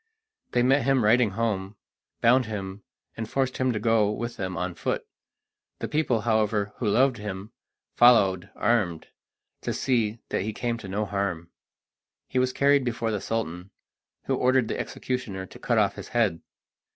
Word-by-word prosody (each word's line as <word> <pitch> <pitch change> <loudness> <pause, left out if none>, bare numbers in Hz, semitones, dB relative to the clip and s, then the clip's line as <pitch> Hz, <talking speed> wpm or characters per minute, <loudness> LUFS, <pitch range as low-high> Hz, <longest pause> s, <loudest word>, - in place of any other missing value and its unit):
They 120 - +3
met 135 +3 +4
him 130 -1 +2
riding 115 +2 +4
home, 105 -3 -1 0.5
bound 125 +1 +4
him, 100 -2 -5 0.3
and 110 -1 -5
forced 130 -2 -1
him 130 -1 +1
to 110 - -2
go 115 -2 +3
with 120 +3 -4
them 95 -2 -4
on 90 +1 -2
foot. - - -2 0.7
The - - -4
people, 140 -7 +1
however, 105 -2 +1
who 120 - -2
loved 130 +4 +3
him, 105 0 -6 0.4
followed, 100 -6 +5
armed, 100 -8 0 0.5
to - - -2
see 115 -4 0
that - - -1
he 110 +3 -3
came 120 0 -2
to 100 - -8
no 100 +3 -1
harm. 95 -4 -3 0.8
He 130 - 0
was 130 0 +2
carried 140 +1 +3
before 115 -2 -1
the 105 -3 -2
Sultan, 95 -5 -3 0.5
who - - -1
ordered 130 -2 +2
the - - -2
executioner 115 -7 -4
to - - -14
cut 120 - 0
off 100 -2 +3
his - - -7
head. 110 -8 +1
110 Hz, 165 wpm, -26 LUFS, 100-125 Hz, 0.8 s, followed